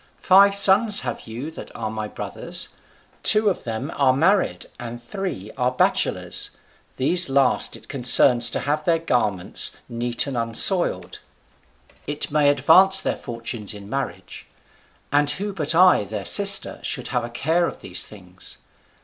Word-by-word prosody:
Five 195 Hz, +1 st, +3 dB
sons 200 Hz, +2 st, +6 dB
have 125 Hz, -2 st, -7 dB
you 120 Hz, +8 st, -8 dB
that -, -, -11 dB
are 110 Hz, -2 st, -6 dB
my 110 Hz, -1 st, -6 dB
brothers; -, -, -5 dB, 0.5 s
two 215 Hz, -1 st, +3 dB
of -, -, -8 dB
them 115 Hz, +6 st, -6 dB
are 135 Hz, -2 st, +1 dB
married, 185 Hz, +9 st, 0 dB
and 120 Hz, 0 st, -8 dB
three 120 Hz, -, -7 dB
are 125 Hz, 0 st, +1 dB
bachelors; 125 Hz, -, -1 dB, 0.5 s
these 170 Hz, +5 st, +3 dB
last 135 Hz, -3 st, +1 dB
it 110 Hz, -1 st, -15 dB
concerns 125 Hz, -2 st, +4 dB
to -, -, -4 dB
have 150 Hz, +2 st, -3 dB
their 165 Hz, +1 st, 0 dB
garments 105 Hz, -, -1 dB
neat 120 Hz, 0 st, -3 dB
and 140 Hz, -2 st, -7 dB
unsoiled; 115 Hz, -, +2 dB, 0.9 s
it 145 Hz, 0 st, -3 dB
may 150 Hz, -1 st, +2 dB
advance 185 Hz, +7 st, +3 dB
their -, -, -3 dB
fortunes 115 Hz, -3 st, -6 dB
in 100 Hz, 0 st, -13 dB
marriage: 95 Hz, -10 st, -7 dB, 0.6 s
and 145 Hz, 0 st, +2 dB
who 205 Hz, +5 st, -2 dB
but 160 Hz, -3 st, -3 dB
I 180 Hz, -, +4 dB
their 100 Hz, 0 st, -7 dB
sister 200 Hz, -1 st, +5 dB
should -, -, -5 dB
have -, -, -3 dB
a 120 Hz, -, -7 dB
care 160 Hz, +8 st, -1 dB
of -, -, -10 dB
these 90 Hz, -1 st, +1 dB
things? 90 Hz, -3 st, -7 dB
135 Hz, 150 wpm, -21 LUFS, 115-175 Hz, 0.9 s, sons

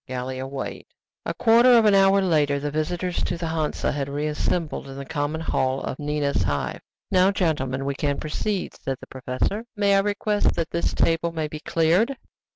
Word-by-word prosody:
GALLIA 130 Hz, +1 st, -4 dB
WEIGHED 135 Hz, 0 st, -6 dB, 0.4 s
A -, -, -1 dB
quarter 235 Hz, +2 st, +6 dB
of 225 Hz, -, +4 dB
an 210 Hz, -, +5 dB
hour 195 Hz, 0 st, +5 dB
later, 150 Hz, -5 st, +2 dB
the 145 Hz, +1 st, -3 dB
visitors 175 Hz, +4 st, -2 dB
to 175 Hz, -, -2 dB
the 165 Hz, -1 st, -3 dB
Hansa 160 Hz, -2 st, -1 dB
had 140 Hz, -1 st, -3 dB
reassembled 150 Hz, +2 st, -2 dB
in 135 Hz, 0 st, -9 dB
the 140 Hz, -, -6 dB
common 150 Hz, +1 st, -2 dB
hall 130 Hz, -4 st, 0 dB
of -, -, -4 dB
Nina's 145 Hz, -4 st, 0 dB
Hive. 75 Hz, -5 st, -2 dB, 0.3 s
"Now, 185 Hz, +1 st, +5 dB
gentlemen, 135 Hz, -9 st, -1 dB
we 140 Hz, -, -1 dB
can 140 Hz, 0 st, -1 dB
proceed," 185 Hz, +5 st, -2 dB
said 135 Hz, -1 st, -4 dB
the -, -, -10 dB
professor. 130 Hz, -, -3 dB
"May 200 Hz, -1 st, +3 dB
I -, -, +5 dB
request 205 Hz, +1 st, +1 dB
that 165 Hz, -, -2 dB
this 170 Hz, -, -1 dB
table 165 Hz, +1 st, +1 dB
may 160 Hz, -2 st, -2 dB
be 150 Hz, 0 st, -7 dB
cleared?" 175 Hz, -, +2 dB
155 Hz, 185 wpm, -24 LUFS, 140-185 Hz, 0.4 s, quarter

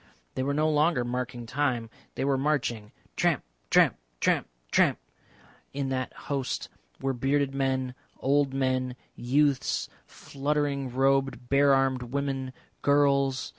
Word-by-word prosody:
They -, -, -2 dB
were 140 Hz, +2 st, 0 dB
no 155 Hz, +1 st, +2 dB
longer 150 Hz, -4 st, +2 dB
marking 125 Hz, -1 st, -4 dB
time, 125 Hz, -2 st, -1 dB, 0.3 s
they -, -, -1 dB
were 140 Hz, -1 st, +2 dB
marching; 130 Hz, -7 st, -1 dB, 0.2 s
tramp, -, -, +1 dB, 0.3 s
tramp, -, -, +5 dB, 0.2 s
tramp, -, -, +2 dB, 0.2 s
tramp. -, -, +4 dB, 0.8 s
In 140 Hz, -1 st, -2 dB
that 130 Hz, -1 st, -2 dB
host 135 Hz, -3 st, -3 dB, 0.3 s
were 135 Hz, -, -1 dB
bearded 135 Hz, +2 st, +1 dB
men, 130 Hz, -2 st, 0 dB, 0.2 s
old 140 Hz, 0 st, +2 dB
men, 130 Hz, -1 st, 0 dB, 0.2 s
youths, 140 Hz, +2 st, +1 dB, 0.2 s
fluttering 140 Hz, -1 st, -2 dB
robed 135 Hz, 0 st, +1 dB
bare 140 Hz, 0 st, +5 dB
armed 135 Hz, -1 st, +1 dB
women, 135 Hz, +1 st, -3 dB, 0.3 s
girls. 140 Hz, -2 st, +2 dB
135 Hz, 125 wpm, -28 LUFS, 130-140 Hz, 0.8 s, tramp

